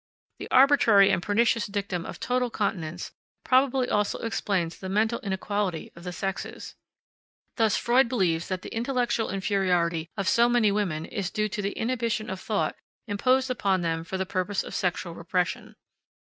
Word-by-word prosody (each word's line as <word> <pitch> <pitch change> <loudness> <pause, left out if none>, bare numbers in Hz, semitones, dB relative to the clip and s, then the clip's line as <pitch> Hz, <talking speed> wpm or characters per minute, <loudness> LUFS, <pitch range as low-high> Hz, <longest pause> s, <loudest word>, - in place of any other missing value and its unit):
The - - -7
arbitrary 255 -7 +6
and 175 - +1
pernicious 225 +3 +2
dictum 200 -4 -3
of - - -8
total 250 0 0
continence 180 -6 -3 0.3
probably 260 0 +3
also 210 -3 0
explains 190 -7 -1
the 190 - -6
mental 220 +4 +1
inequality 195 -3 -2
of 170 - -12
the 180 - -5
sexes. 195 +2 -5 0.8
Thus 220 -6 +3
Freud 240 +1 +3
believes 175 -9 0
that 185 -1 -3
the - - -8
intellectual 240 -1 0
inferiority 180 -4 0
of 195 -2 -2
so 235 +6 +4
many 240 -4 +3
women 180 -7 -1
is 195 -5 -3
due 215 0 -1
to 205 - -3
the 200 0 -2
inhibition 230 -3 -1
of 190 - -5
thought 210 +1 -1 0.3
imposed 255 +5 +2
upon 195 -6 +1
them 165 -1 -1
for 190 +3 -4
the 190 - -1
purpose 185 +2 -1
of - - -9
sexual 175 -1 -2
repression. 175 +1 -2
200 Hz, 165 wpm, -26 LUFS, 180-230 Hz, 0.8 s, arbitrary